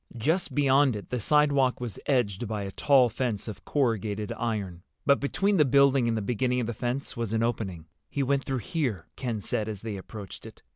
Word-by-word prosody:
Just 160 +11 0
beyond 140 -2 +4
it 105 - -8
the 125 - -1
sidewalk 140 0 +3
was 120 -6 -5
edged 120 -6 +1
by 105 -1 -3
a 100 - -5
tall 135 +3 +4
fence 115 -2 -2
of 110 - -7
corrugated 110 -6 0
iron, 105 -7 -3 0.2
but 140 - +4
between 195 +8 +1
the 150 - +6
building 140 -2 +4
and 115 -1 +1
the 110 - -2
beginning 125 +4 0
of 120 - -1
the 120 - -3
fence 125 +5 -3
was 115 -2 -3
an 115 0 +1
opening. 95 -8 -2 0.2
"He 140 - -1
went 135 +1 +1
through 130 -3 -3
here," 125 - -1
Ken 115 -5 -3
said, 110 +2 -2
as 105 -3 -5
they 110 -3 -4
approached 100 0 -9
it. - - -15
120 Hz, 205 wpm, -27 LUFS, 105-135 Hz, 0.2 s, the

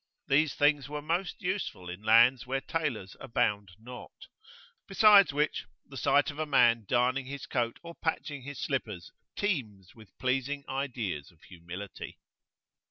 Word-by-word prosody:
These 145 +2 +2
things 145 -2 +2
were 150 0 -4
most 175 +5 -2
useful 180 - -3
in 90 +2 -7
lands 120 +4 +5
where 135 +1 -1
tailors 135 - -3
abound 100 -4 -1
not; 125 +3 -11 0.6
besides 200 -2 +6
which, 150 +2 -1 0.2
the 135 - -13
sight 140 +4 +2
of 145 - -12
a 155 - -1
man 115 -5 +4
darning 125 +3 +1
his 140 0 -6
coat 120 -2 -1
or 170 0 -8
patching 155 -4 -3
his 145 +1 -8
slippers 105 -10 -3 0.2
teems 110 - -3
with 110 -5 -18
pleasing 135 +3 -1
ideas 120 - -3
of 85 - -25
humility. 90 +2 -9
130 Hz, 145 wpm, -29 LUFS, 110-145 Hz, 0.6 s, besides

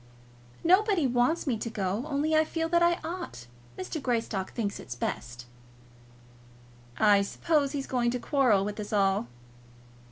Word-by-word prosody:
"Nobody 375 -1 +4
wants 245 +6 +1
me 245 -7 -1
to 230 - -3
go, 205 +4 -2
only 300 +1 0
I 310 - +5
feel 325 +1 -2
that 340 0 +3
I 345 0 +4
ought. 335 - -6 0.3
Mr. 235 - -5
Greystock 225 -6 -2
thinks 205 -4 -3
it 120 - -8
best." 120 0 -4 1.5
"I 205 -2 +5
suppose 285 +7 0
he's 275 -2 -3
going 245 -2 0
to 250 +1 -2
quarrel 240 -9 +2
with 210 +1 -5
us 205 - -5
all." 195 - +2
245 Hz, 150 wpm, -28 LUFS, 205-315 Hz, 1.5 s, I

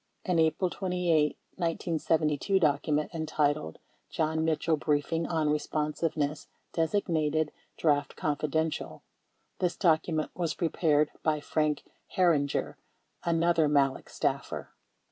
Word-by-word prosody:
An 180 -3 +2
April 160 +3 +2
28, 175 -5 +1 0.2
1972, 165 0 +1
document 150 0 +1
entitled 150 - 0 0.3
"John 160 0 0
Mitchell 160 0 +1
Briefing 155 +2 0
On 160 -3 0
Eesponsiveness" 150 0 -1 0.3
designated 160 -3 +1 0.3
"Draft 145 -3 +1
Confidential." 155 +1 -2 0.6
This 180 -1 0
document 160 -2 +1
was 170 -3 -2
prepared 155 -3 +2
by 155 -1 +1
Frank 150 0 0 0.3
Herringer, 165 -7 +2 0.5
another 170 -1 +3
Malek 140 -2 +1
staffer. - - -2
155 Hz, 95 wpm, -29 LUFS, 150-165 Hz, 0.6 s, another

